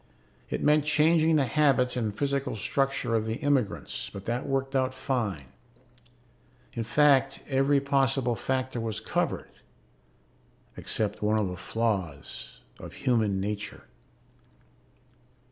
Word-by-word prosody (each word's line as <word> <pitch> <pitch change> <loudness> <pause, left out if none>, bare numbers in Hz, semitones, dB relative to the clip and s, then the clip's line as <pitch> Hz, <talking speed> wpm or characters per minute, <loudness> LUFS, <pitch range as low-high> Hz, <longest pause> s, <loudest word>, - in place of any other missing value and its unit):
It - - -3
meant 150 0 +4
changing 160 +1 +4
the 145 -3 +3
habits 130 -2 +2
and 110 -4 -2
physical 140 -2 -1
structure 135 +2 0
of 110 -1 +1
the 110 - -1
immigrants, 135 -6 -1
but 100 -1 -9
that 120 +4 -2
worked 135 0 -1
out 130 -1 +1
fine. 105 - -2 1.2
In 115 - -2
fact, 135 +1 +3
every 135 +1 +3
possible 135 -3 +1
factor 130 0 -2
was 110 -2 -3
covered 110 - -2 1.2
except 105 -1 -1
one 105 +1 +2
of 105 -3 0
the 90 - -5
flaws 95 -7 -3 0.2
of - - -9
human 110 -6 +1
nature.... 105 +1 -4
125 Hz, 120 wpm, -28 LUFS, 110-140 Hz, 1.2 s, meant